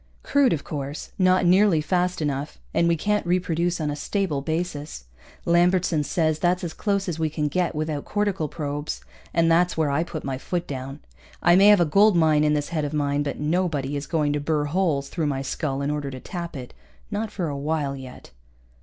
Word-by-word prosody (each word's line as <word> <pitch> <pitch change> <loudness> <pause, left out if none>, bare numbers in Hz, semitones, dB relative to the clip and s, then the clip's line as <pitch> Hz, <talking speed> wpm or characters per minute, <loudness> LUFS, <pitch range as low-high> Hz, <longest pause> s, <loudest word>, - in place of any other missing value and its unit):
Crude, 280 -2 +3
of 150 -4 -1
course, 145 0 -5
not 185 0 +4
nearly 185 -1 +5
fast 180 +1 0
enough, 145 0 -3 0.2
and 170 - +3
we 170 - +3
can't 210 +5 0
reproduce 175 0 0
on 150 -2 -1
a - - -3
stable 155 -1 -1
basis. 155 - -4 0.4
Lambertson 175 -2 +3
says 155 -1 0
that's 180 +1 +1
as 165 -2 -4
close 200 -1 -1
as 165 -2 -3
we 160 -1 +1
can 150 -1 -1
get 175 +3 -1
without 155 -1 -2
cortical 205 -6 -1
probes. 145 0 -4 0.3
And 165 0 +3
that's 175 +1 +3
where 155 -3 +1
I 150 +4 +1
put 160 -2 -6
my 135 -1 -3
foot 175 +4 -3
down. 135 0 -6 0.4
I 175 +1 +6
may 195 +2 +7
have 210 -2 +7
a - - +4
gold 200 +6 +4
mine 155 -2 +4
in 150 0 +3
this 145 -1 -2
head 160 -3 -1
of 145 +1 -3
mine, 145 -1 0
but 145 -1 -3
nobody 150 -3 0
is 140 0 -4
going 150 -2 +1
to 145 - 0
put 145 - -8
burr 150 -2 +1
holes 150 -3 0
through 165 -4 -2
my 135 -2 -2
skull 140 -1 -2
in 145 - 0
order 145 -2 -3
to 130 -1 -7
tap 170 +2 -6
it. 125 -2 -9 0.4
Not 215 +1 -2
for 185 -5 -3
a 145 - -3
while 145 -1 -1
yet. 130 -2 -11
155 Hz, 215 wpm, -24 LUFS, 145-180 Hz, 0.4 s, may